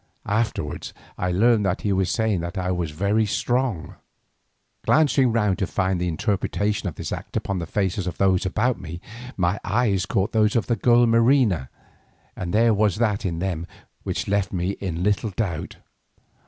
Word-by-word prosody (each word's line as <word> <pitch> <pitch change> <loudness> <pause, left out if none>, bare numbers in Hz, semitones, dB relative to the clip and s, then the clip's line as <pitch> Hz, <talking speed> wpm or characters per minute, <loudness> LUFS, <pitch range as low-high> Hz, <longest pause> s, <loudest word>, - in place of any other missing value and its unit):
Afterwards 105 -8 -2 0.2
I 90 0 -1
learned 110 +4 +3
that 90 - -1
he 100 - 0
was 95 -1 +1
saying 110 -4 +1
that 85 +2 -5
I 90 0 -1
was 90 -3 -1
very 100 +8 +1
strong. 120 -4 -1 0.9
Glancing 140 -5 +3
round 105 -4 +1
to 95 - 0
find 95 -2 0
the 90 - 0
interpretation 100 +3 -1
of 80 - -10
this - - -5
act - - -5
upon 100 -2 -2
the 85 - -4
faces 95 0 -1
of 90 - -4
those 95 -2 +3
about 115 +6 0
me, 85 +2 -7 0.4
my 90 +2 +1
eyes 100 -3 +1
caught 100 +4 0
those 110 -1 +2
of 115 - +2
the 120 - +1
girl 120 +3 +4
Marina, 115 - +3 0.7
and 85 -1 -4
there 115 +3 +4
was 105 -3 +2
that 105 -3 0
in 85 -2 -3
them 85 -2 -3 0.3
which - - -3
left 100 -1 0
me 90 0 -1
in 90 -4 -4
little 105 +2 +1
doubt. 95 -5 -3
100 Hz, 175 wpm, -23 LUFS, 90-110 Hz, 0.9 s, girl